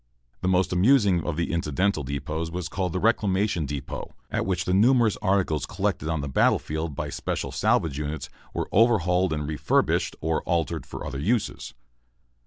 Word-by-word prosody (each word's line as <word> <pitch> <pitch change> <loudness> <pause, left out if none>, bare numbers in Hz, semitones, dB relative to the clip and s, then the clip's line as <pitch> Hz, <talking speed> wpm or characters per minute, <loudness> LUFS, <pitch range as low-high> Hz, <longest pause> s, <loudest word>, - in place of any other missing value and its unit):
] - - -43
The - - -1
most 95 0 +2
amusing 100 - +4
of 85 -3 -2
the 85 - -1
incidental 85 +2 0
depots 70 +4 -3
was 90 0 -4
called 95 -2 -2
the 90 - -2
Reclamation 100 -6 +1
Depot, 70 -2 -6 0.2
at - - -1
which 90 -2 0
the 90 - 0
numerous 115 +2 +4
articles 95 -7 +1
collected 75 - -2
on 80 -2 -1
the 70 - -4
battle 65 - +3
field 80 -1 -4
by - - -4
special - - -3
salvage 105 - +1
units 75 +1 -4 0.2
were - - -3
overhauled 95 -5 +3
and 75 -2 -2
refurbished, 75 -1 +1
or 80 0 0
altered 85 -5 -1
to - - -7
other 70 - -5
uses. 110 - -1
85 Hz, 175 wpm, -25 LUFS, 75-100 Hz, 0.2 s, amusing